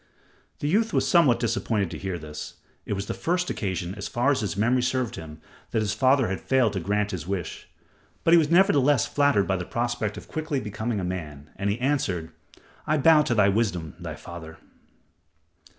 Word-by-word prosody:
The 145 Hz, -, -1 dB
youth 220 Hz, +7 st, +1 dB
was -, -, +2 dB
somewhat 145 Hz, -10 st, +4 dB
disappointed 110 Hz, -5 st, -1 dB
to 80 Hz, -, -5 dB
hear 95 Hz, -2 st, -3 dB
this. 75 Hz, -2 st, -8 dB, 0.3 s
It -, -, -1 dB
was 100 Hz, 0 st, -3 dB
the -, -, -3 dB
first 180 Hz, +1 st, -1 dB
occasion, 95 Hz, -3 st, -3 dB
as 100 Hz, -1 st, -5 dB
far 125 Hz, +4 st, +1 dB
as 140 Hz, -, +1 dB
his 100 Hz, -2 st, -3 dB
memory 120 Hz, +5 st, +2 dB
served 125 Hz, -1 st, -1 dB
him, 80 Hz, -1 st, -9 dB, 0.3 s
that 110 Hz, -, 0 dB
his 100 Hz, -1 st, -1 dB
father 130 Hz, +3 st, +3 dB
had 95 Hz, -, -3 dB
failed 130 Hz, -6 st, +2 dB
to 95 Hz, -, -1 dB
grant 105 Hz, +3 st, -1 dB
his 85 Hz, -3 st, -5 dB
wish; 95 Hz, -3 st, -4 dB, 0.5 s
but 165 Hz, -, +4 dB
he -, -, +9 dB
was 150 Hz, -2 st, +1 dB
nevertheless 145 Hz, -, +4 dB
flattered 145 Hz, -8 st, +2 dB
by 95 Hz, -, 0 dB
the 90 Hz, -, -4 dB
prospect 120 Hz, 0 st, -2 dB
of -, -, -9 dB
quickly 155 Hz, -3 st, -2 dB
becoming 110 Hz, 0 st, -3 dB
a -, -, -3 dB
man, 75 Hz, -5 st, -6 dB
and 100 Hz, -, -2 dB
he 105 Hz, +4 st, -1 dB
answered, 105 Hz, -, -1 dB, 0.6 s
"I 155 Hz, -, +2 dB
bow 155 Hz, +1 st, +6 dB
to 150 Hz, -6 st, 0 dB
thy 100 Hz, -2 st, +5 dB
wisdom, 95 Hz, -7 st, -1 dB
my -, -, -6 dB
father." 80 Hz, -2 st, -10 dB
110 Hz, 200 wpm, -25 LUFS, 95-135 Hz, 0.6 s, he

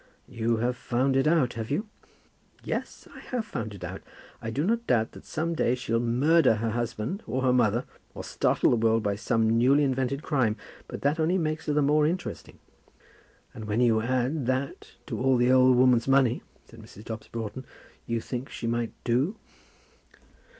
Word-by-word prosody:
"You 115 Hz, 0 st, -1 dB
have 120 Hz, +2 st, 0 dB
found 130 Hz, +2 st, 0 dB
it 135 Hz, +2 st, +3 dB
out, 155 Hz, -6 st, +3 dB
have 110 Hz, 0 st, -5 dB
you?" 205 Hz, +11 st, -1 dB, 0.8 s
"Yes, -, -, -5 dB
I -, -, -10 dB
have 245 Hz, -4 st, -4 dB
found 110 Hz, -, -5 dB
it 90 Hz, -, -11 dB
out. 90 Hz, +2 st, -6 dB, 0.4 s
I 115 Hz, -, -4 dB
do 135 Hz, +6 st, -1 dB
not 235 Hz, +3 st, 0 dB
doubt 110 Hz, -2 st, +2 dB
that -, -, -13 dB
some 165 Hz, +2 st, -2 dB
day 125 Hz, -6 st, +1 dB
she'll 115 Hz, -2 st, -1 dB
murder 130 Hz, +4 st, +3 dB
her 110 Hz, +1 st, -2 dB
husband 120 Hz, -, -3 dB
or 130 Hz, +1 st, -2 dB
her 130 Hz, -1 st, +3 dB
mother, 120 Hz, -1 st, +2 dB, 0.3 s
or -, -, -6 dB
startle -, -, +1 dB
the 120 Hz, -, +3 dB
world 115 Hz, 0 st, +2 dB
by 100 Hz, -1 st, 0 dB
some 115 Hz, +1 st, +1 dB
newly 140 Hz, +4 st, +4 dB
invented 135 Hz, +1 st, -1 dB
crime; 125 Hz, -8 st, +1 dB, 0.3 s
but -, -, -8 dB
that 145 Hz, +3 st, +1 dB
only 165 Hz, +4 st, +2 dB
makes 155 Hz, -2 st, -2 dB
her 150 Hz, -, +1 dB
the 150 Hz, 0 st, +2 dB
more 150 Hz, +1 st, +3 dB
interesting." 180 Hz, +3 st, -5 dB, 1.0 s
"And 110 Hz, -, -8 dB
when 105 Hz, +2 st, -1 dB
you 115 Hz, -3 st, +3 dB
add 125 Hz, +3 st, 0 dB
to 160 Hz, -, -2 dB
that 130 Hz, +2 st, -2 dB, 0.2 s
all 130 Hz, 0 st, +2 dB
the 120 Hz, +1 st, +3 dB
old 130 Hz, -1 st, +5 dB
woman's 125 Hz, -1 st, +4 dB
money," 135 Hz, -3 st, +3 dB, 0.2 s
said -, -, -15 dB
Mrs. 105 Hz, -, -14 dB
Dobbs 110 Hz, -1 st, -7 dB
Broughton, 115 Hz, +2 st, -6 dB, 0.4 s
"you 115 Hz, -1 st, -1 dB
think 125 Hz, +2 st, -5 dB
that -, -, -15 dB
she -, -, -6 dB
might 115 Hz, 0 st, -1 dB
do?" 130 Hz, -, +1 dB
125 Hz, 190 wpm, -27 LUFS, 115-140 Hz, 1.0 s, old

